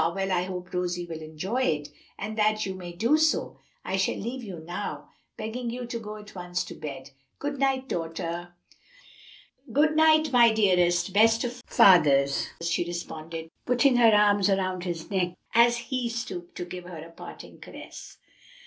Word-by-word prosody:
well 195 0 -1
I 180 -1 +1
hope 180 -1 -7
Rosie 180 -1 -2
will 165 -2 -7
enjoy 160 +11 -3
it. 150 - 0 0.3
And 215 +2 -5
that 215 0 +2
you 190 - -3
may 180 -2 -8
do 230 - +2
so, 315 0 +1 0.3
I 190 - -1
shall 190 - +1
leave 245 +5 -5
you 195 -5 -7
now, 165 +2 -6 0.3
begging 235 +2 -4
you 245 +1 -5
to 235 0 -5
go 215 -1 -7
at 210 -1 -12
once 180 -1 -3
to - - -9
bed. 140 -2 -8 0.3
Good 285 -1 -4
night, 265 -1 +1
daughter." 170 0 -4 1.2
"Good 305 +5 +3
night, 315 -1 +5
my 240 -2 +6
dearest, 180 -3 +2
best 225 +2 +4
of 245 +1 -5
fathers," 140 -7 +5 0.2
she 170 +1 +1
responded, 165 -1 -6 0.2
putting 250 +1 +4
her 235 -2 +7
arms 205 -1 +4
round 185 -2 0
his 170 +1 -5
neck 180 -2 0 0.2
as 235 +1 +5
he 245 0 -3
stooped 180 -7 -6
to 175 - -4
give 180 0 -8
her 175 -2 -8
a 160 +2 -10
parting - - -11
caress. - - -11
190 Hz, 170 wpm, -27 LUFS, 175-235 Hz, 1.2 s, her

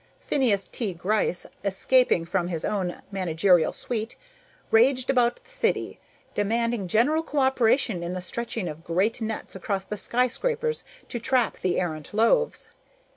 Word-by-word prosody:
Phineas 225 -9 +1
T. 205 -7 -3
Gryce, 185 +1 0 0.2
escaping 200 -1 +2
from 175 0 -1
his 165 -3 -3
own 185 -4 -2
managerial 180 -2 +3
suite, 225 -1 -4 0.6
raged 255 +3 +4
about 245 -2 +1
the - - -19
city, - - -1 0.3
demanding 230 0 0
general 250 - +3
cooperation 265 - +2
in 170 +1 -3
the 185 - -3
stretching 225 -1 -3
of 155 +1 -7
great 190 +8 0
nets 220 0 -4
between 195 +1 -2
the 210 - -3
skyscrapers 465 - 0 0.2
to 240 - -4
trap 250 -1 +1
the 185 -1 0
errant 160 0 -4
loaves. 470 - +2
220 Hz, 135 wpm, -26 LUFS, 185-250 Hz, 0.6 s, raged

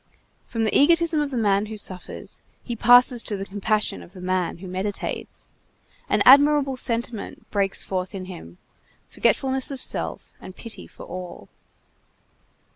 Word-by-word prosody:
From 225 -1 -2
the 220 - 0
egotism 335 +1 +4
of 295 - -1
the 260 - -4
man 205 -2 +2
who 215 0 -7
suffers 185 -3 -5 0.2
he 240 - -4
passes 245 +1 +6
to 210 - -1
the 195 - -5
compassion 210 +2 -1
of 175 - -15
the 185 - -11
man 185 -1 -1
who 185 +2 -10
meditates. 190 +3 -5 0.6
An - - +3
admirable 285 0 +6
sentiment 235 -2 -3
breaks 195 -2 0
forth 185 +1 -4
in 185 -1 -6
him, 130 - -10 0.5
forgetfulness 265 -1 +1
of 275 -2 -6
self - - -3
and 185 - -10
pity 220 -4 -7
for - - -13
all. 180 0 -8
215 Hz, 150 wpm, -23 LUFS, 190-255 Hz, 0.6 s, passes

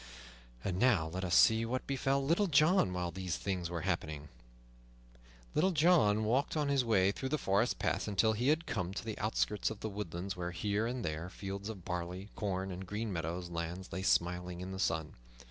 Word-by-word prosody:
And 95 -1 -2
now 105 -11 +3
let 95 +3 -4
us 85 -2 +1
see 110 0 +6
what 125 +3 -2
befell 135 0 0
Little 170 +8 +3
John 155 - +4
while 90 -1 -2
these 90 0 -3
things 90 -4 -2
were 85 -1 -3
happening. 80 -5 -2 1.2
Little 185 +5 +3
John 150 - +4
walked 130 +8 +1
on 150 -2 +1
his 140 -2 +3
way 100 -5 +3
through 130 +6 -4
the 155 - +1
forest 100 0 +1
paths - - -1
until 105 +2 +3
he 120 +4 -1
had 155 +3 +3
come 95 -4 -3
to - - -4
the 110 -2 -5
outskirts 105 -1 0
of 110 - -8
the 110 - -2
woodlands, 95 -2 -4
where, 90 -1 -3
here 100 +5 -1
and 125 -1 -3
there, 80 +2 -3
fields 100 +2 -6
of 95 -6 -8
barley, 90 +2 -4
corn, 95 -2 -2
or 90 - -5
green 105 +3 -4
meadow 85 0 -2
lands 85 +1 -5
lay 95 - -2
smiling 90 -1 +1
in 90 +1 -5
the 95 - -5
sun. 80 -5 0
100 Hz, 195 wpm, -33 LUFS, 90-115 Hz, 1.2 s, see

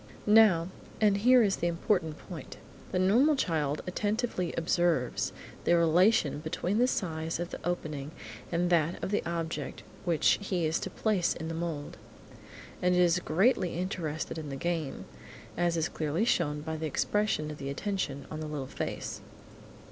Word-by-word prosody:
Now, 210 -6 +6 0.3
and 205 -2 +4
here 245 +3 +6
is 195 -2 +1
the 175 - 0
important 170 -2 0
point, 165 -7 -9 0.3
the - - 0
normal 235 +12 +4
child 155 - 0
attentively 205 -1 -1
observes 165 -6 +1 0.3
the 170 - +4
relation 170 -1 +4
between 170 +6 -1
the 250 - +5
size 165 -8 -2
of 175 0 -4
the - - -6
opening 155 -5 -3 0.4
and 175 +1 +1
that 170 0 +2
of - - -2
the 210 - +2
object 160 -5 -4 0.2
which 170 -5 +3
he 185 -4 -1
is 155 +1 +1
to - - -4
place 205 -6 +1
in 160 -1 -5
the - - -3
mould, 165 -3 -4 0.8
and 180 0 +3
is 180 0 +4
greatly 180 0 +2
interested 165 -4 -3
in 150 -2 -6
the 135 - -4
game, 165 -2 -3 0.5
as 175 -1 +1
is 160 -1 +1
clearly 160 +7 -1
shown 150 -9 +1
by 160 +1 -4
the 160 0 -2
expression 195 -1 0
of 150 - -9
attention 140 0 -3
on 155 - -4
the 155 - -4
little 150 -3 -4
face. - - -5
170 Hz, 160 wpm, -30 LUFS, 155-190 Hz, 0.8 s, Now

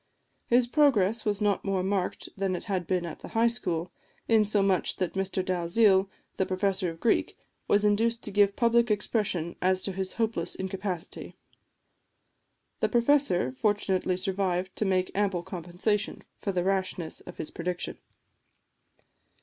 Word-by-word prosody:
His 240 +1 +4
progress 235 -6 +3
was 205 -1 0
not 205 -2 +1
more 195 -2 0
marked 190 -1 -1
than 195 -2 -1
it - - -5
had 190 -5 -2
been 180 -2 0
at 165 - -7
the - - -9
High 225 +1 +2
School, 180 -8 -1 0.4
insomuch 205 -4 +2
that 185 -2 -2
Mr 190 -1 -1
Dalziel, 190 +2 +3 0.3
the 190 - +1
professor 190 0 0
of 165 0 -9
Greek, 230 - +1 0.3
was 205 +1 +3
induced 225 +3 +2
to 210 - -4
give 200 0 +3
public 235 0 +3
expression 205 -5 0
as 185 0 +2
to 195 - -2
his 190 0 -4
hopeless 225 -7 -1
incapacity. 190 -2 -5 1.4
The - - +1
professor 240 - +2
fortunately 190 +2 0
survived 185 -1 -1
to 215 - 0
make 185 -1 +1
ample 195 -3 0
compensation 185 +3 -2 0.2
for 200 - -2
the 180 -2 0
rashness 185 -3 -1
of 180 - -11
his - - -5
prediction. 180 +1 -4
195 Hz, 145 wpm, -28 LUFS, 180-210 Hz, 1.4 s, His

